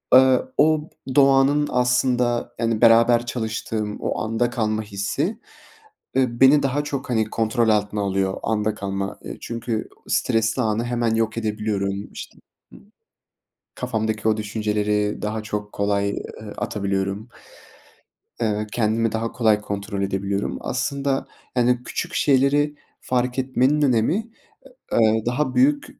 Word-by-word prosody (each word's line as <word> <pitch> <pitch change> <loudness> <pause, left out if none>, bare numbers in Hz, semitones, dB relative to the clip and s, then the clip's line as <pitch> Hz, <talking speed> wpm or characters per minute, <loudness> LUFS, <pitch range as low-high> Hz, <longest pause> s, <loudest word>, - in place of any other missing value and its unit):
ııı, 130 - +5
o 155 0 +3 0.2
b 130 - -5
doğanın 140 +1 +4
aslında, 125 -1 +1
yani, 115 -1 0
beraber 115 +1 +5
çalıştığım 110 -3 -3
o - - -2
anda 115 +2 0
kalma 110 -2 -1
hissi, 110 - -2 0.8
ııı, 120 -3 +1
beni 140 +2 +7
daha 140 +2 0
çok, 145 -3 -4
hani, 110 -3 +1
kontrol 115 +1 +1
altına 105 -1 +1
alıyor, 95 -1 0
anda 105 0 0
kalma. 100 -1 -4
Eee, - - -7
çünkü 115 -1 -4 0.2
stresli 115 +3 +1
anı 110 0 0
hemen 120 -2 0
yok 115 0 0
edebiliyorum. 105 -2 -2
İşte, - - -9 0.4
ımm, - - -17 0.8
kafamdaki 110 -1 -2
o 110 0 +3
düşünceleri 105 -1 -1
daha 110 +1 -2
çok 105 0 -5
kolay, 100 0 0 0.3
ııı, 105 -1 -8
atabiliyorum. 100 +2 -2 1.1
Eee, 105 -2 +1
ve 105 - -3
kendimi 115 0 +1
daha 115 +1 -2
kolay 110 -3 +2
kontrol 100 -1 -4
edebiliyorum. 100 +1 -2
Aslında, 135 +2 -1 0.3
yani, 125 0 +2
küçük - - -4
şeyleri 145 +2 +3 0.3
fark 125 0 -1
etmenin 130 +3 +2
önemi 145 - +1 0.6
ı - - +2
ııı, 110 -1 +3
daha 130 +2 -1
büyük 145 +3 +3
115 Hz, 130 wpm, -22 LUFS, 105-125 Hz, 1.1 s, beni